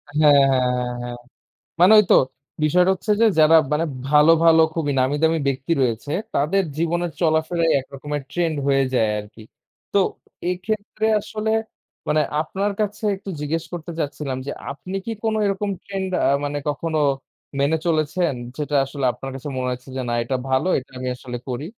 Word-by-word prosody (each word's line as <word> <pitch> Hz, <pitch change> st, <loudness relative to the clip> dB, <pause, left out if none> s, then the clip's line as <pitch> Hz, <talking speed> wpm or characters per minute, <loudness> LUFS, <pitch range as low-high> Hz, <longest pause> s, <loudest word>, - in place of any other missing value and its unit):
হ্যাঁ, 150 Hz, -1 st, +6 dB, 0.2 s
হ্যাঁ, 125 Hz, -1 st, +2 dB
হ্যাঁ, 125 Hz, 0 st, -2 dB
হ্যাঁ। 120 Hz, 0 st, -6 dB, 0.6 s
মানে 180 Hz, +4 st, +7 dB
ওই -, -, +6 dB
তো -, -, +8 dB, 0.5 s
বিষয়টা 180 Hz, +5 st, +4 dB
হচ্ছে 210 Hz, +3 st, -2 dB
যে -, -, +6 dB
যারা 155 Hz, +1 st, +7 dB, 0.2 s
মানে 160 Hz, +2 st, +1 dB, 0.2 s
ভালো, 150 Hz, +2 st, +6 dB
ভালো 165 Hz, -1 st, +6 dB
খুবই 155 Hz, -3 st, -1 dB
নামি 130 Hz, +3 st, +2 dB
দামি 160 Hz, 0 st, +3 dB
ব্যক্তি 135 Hz, +3 st, -2 dB
রয়েছে, 120 Hz, +3 st, -1 dB, 0.2 s
তাদের 185 Hz, +8 st, +2 dB
জীবনের 170 Hz, +1 st, 0 dB
চলাফেরাই 165 Hz, +1 st, +2 dB
এক 130 Hz, -, -9 dB
রকমের 145 Hz, +1 st, -4 dB
ট্রেন্ড 170 Hz, -3 st, 0 dB
হয়ে 135 Hz, -1 st, +3 dB
যায় 110 Hz, -3 st, +2 dB
আরকি। 105 Hz, +2 st, -12 dB, 0.5 s
তো 200 Hz, -, +4 dB, 0.5 s
এক্ষেত্রে 215 Hz, +3 st, -2 dB
আসলে 215 Hz, +1 st, -3 dB, 0.6 s
মানে 155 Hz, 0 st, +3 dB, 0.2 s
আপনার 195 Hz, +6 st, -2 dB
কাছে 210 Hz, +2 st, -3 dB
একটু 195 Hz, 0 st, -10 dB
জিজ্ঞেস 160 Hz, +2 st, -2 dB
করতে 170 Hz, 0 st, -5 dB
চাচ্ছিলাম 140 Hz, -3 st, -3 dB
যে -, -, -2 dB, 0.2 s
আপনি 185 Hz, +7 st, -7 dB
কি 230 Hz, -, -3 dB
কোন 220 Hz, -1 st, +1 dB
এরকম 200 Hz, +1 st, -1 dB, 0.2 s
ট্রেন্ড 190 Hz, -1 st, -3 dB, 0.2 s
আ -, -, +4 dB, 0.2 s
মানে 145 Hz, 0 st, -3 dB
কখনো 155 Hz, +2 st, -2 dB, 0.6 s
মেনে 150 Hz, +3 st, +2 dB
চলেছেন? 155 Hz, 0 st, +1 dB, 0.2 s
যেটা 150 Hz, -1 st, -2 dB
আসলে 135 Hz, 0 st, -4 dB
আপনার 135 Hz, 0 st, -7 dB
কাছে 135 Hz, +2 st, -7 dB
মনে 130 Hz, 0 st, -2 dB
হয়েছে 125 Hz, +1 st, -6 dB
যে 130 Hz, -, -1 dB
না -, -, -1 dB
এটা 125 Hz, +3 st, -2 dB
ভালো, 130 Hz, +7 st, +1 dB
এটা 130 Hz, -, -17 dB
আমি 130 Hz, -, -4 dB
আসলে 125 Hz, -1 st, -7 dB
করি? 125 Hz, +5 st, -3 dB
155 Hz, 175 wpm, -22 LUFS, 135-180 Hz, 0.6 s, তো